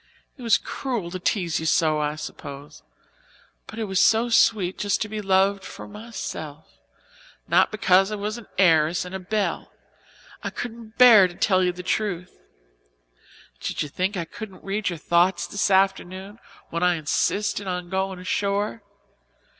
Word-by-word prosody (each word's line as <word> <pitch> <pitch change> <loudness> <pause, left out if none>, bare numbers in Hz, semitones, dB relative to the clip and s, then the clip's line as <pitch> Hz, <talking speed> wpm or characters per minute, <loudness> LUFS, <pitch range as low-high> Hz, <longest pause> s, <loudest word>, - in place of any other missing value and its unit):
It 265 - -15
was 230 -2 +4
cruel 235 -11 -4
to 185 - -5
tease 180 -3 0
you 160 - -3
so, 155 -2 +2
I 150 0 -1
suppose, 145 -1 -9 0.9
but 220 - -10
it 225 - -2
was 190 -2 +1
so 225 +3 +4
sweet 210 -5 +3
just 205 -1 0
to - - -6
be 215 0 -5
loved 195 0 +2
for - - -9
myself 195 -8 -7 0.8
not - - +4
because 195 -2 +3
I - - -1
was 210 +3 -4
an 225 - -14
heiress 165 -2 +3
and 180 - -9
a 190 - -3
belle 205 +2 -2 0.7
I - - -3
couldn't 230 -2 -8
bear 230 -7 +8
to 175 - -12
tell 185 -1 +2
you 180 - +2
the 180 +1 -9
truth. 180 -2 -2 1.2
Did - - -2
you 150 - -7
think 185 +6 -2
I 170 - -2
couldn't 200 +2 -10
read 195 0 -1
your 175 - -4
thoughts 175 +3 +2
this 205 - -1
afternoon, 195 +1 0 0.3
when 170 - -2
I 180 -1 +3
insisted 200 +6 -1
on 180 -1 -4
going 190 0 -1
ashore? 200 +4 -1
190 Hz, 160 wpm, -24 LUFS, 175-210 Hz, 1.2 s, bear